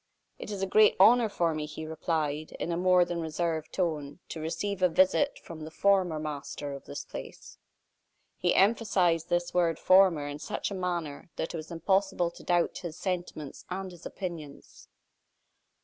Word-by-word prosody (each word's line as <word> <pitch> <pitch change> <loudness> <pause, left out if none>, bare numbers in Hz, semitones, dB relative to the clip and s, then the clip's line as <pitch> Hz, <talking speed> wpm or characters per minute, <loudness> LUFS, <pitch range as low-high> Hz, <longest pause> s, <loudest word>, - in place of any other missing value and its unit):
"It - - -7
is 200 -2 -3
a - - +3
great 210 +2 +5
honor 225 +3 +6
for 170 -5 0
me," 155 -1 -3
he 155 +1 -7
replied, 155 -1 -2
in 170 - -4
a - - 0
more 180 0 +4
than 175 -1 -3
reserved 160 0 -2
tone, 150 -5 -2
"to 160 - -6
receive 190 +5 -3
a 180 - +5
visit 280 - +3
from 165 -2 -9
the 155 - -6
former 185 -1 +2
master 145 -1 -5
of 140 - -9
this 70 - -6
place." - - -10 0.8
He 175 - +1
emphasized 190 -6 +3
this 175 0 0
word 170 -3 +2
"former" 185 -6 +5
in 145 0 -6
such - - -3
a - - -3
manner 175 -6 -3
that 160 - -3
it - - -3
was 155 0 -8
impossible 185 +1 +1
to - - -14
doubt 175 -1 +1
his 170 -3 -7
sentiments 175 -6 -4
and 190 +1 -4
his 175 -2 -14
opinions. 165 -6 -8
175 Hz, 175 wpm, -29 LUFS, 155-185 Hz, 0.8 s, honor